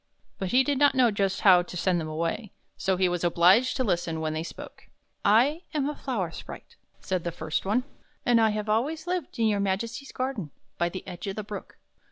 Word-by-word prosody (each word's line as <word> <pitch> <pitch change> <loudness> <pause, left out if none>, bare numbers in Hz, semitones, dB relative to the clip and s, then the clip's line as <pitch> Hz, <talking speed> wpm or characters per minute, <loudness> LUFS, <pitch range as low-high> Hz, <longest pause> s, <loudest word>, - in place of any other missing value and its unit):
But 190 - -2
he 255 +5 +5
did 280 -1 0
not 285 -2 +5
know 250 -3 +5
just 195 -2 0
how 185 -3 +7
to 180 0 -7
send 175 -1 +1
them 155 - -4
away; 165 +7 -3 0.2
so 190 -1 0
he 185 0 +3
was 175 -1 -2
obliged 180 +9 +4
to 260 - +1
listen 175 -6 -1
when 155 -1 -2
they 155 - -2
spoke. 165 - -10 0.2
" - - -47 0.2
I 305 +4 -3
am 285 -2 +1
a 300 - -2
flower 210 -13 -3
sprite," 470 - -10 0.3
said 185 -3 -2
the 170 - -2
first 160 +1 -3
one, 245 +5 +2 0.2
" - - -39
and 240 -2 +5
have 215 -1 +1
always 285 +10 0
lived 355 -7 -3
in 230 - +2
your 210 -2 +2
Majesty's 225 +7 -2
garden, 255 - -3 0.3
by 170 - +2
the 185 +2 -8
edge 180 +2 -7
of 195 - -3
the 215 - -4
Brook. 205 0 -8
200 Hz, 225 wpm, -27 LUFS, 175-255 Hz, 0.3 s, how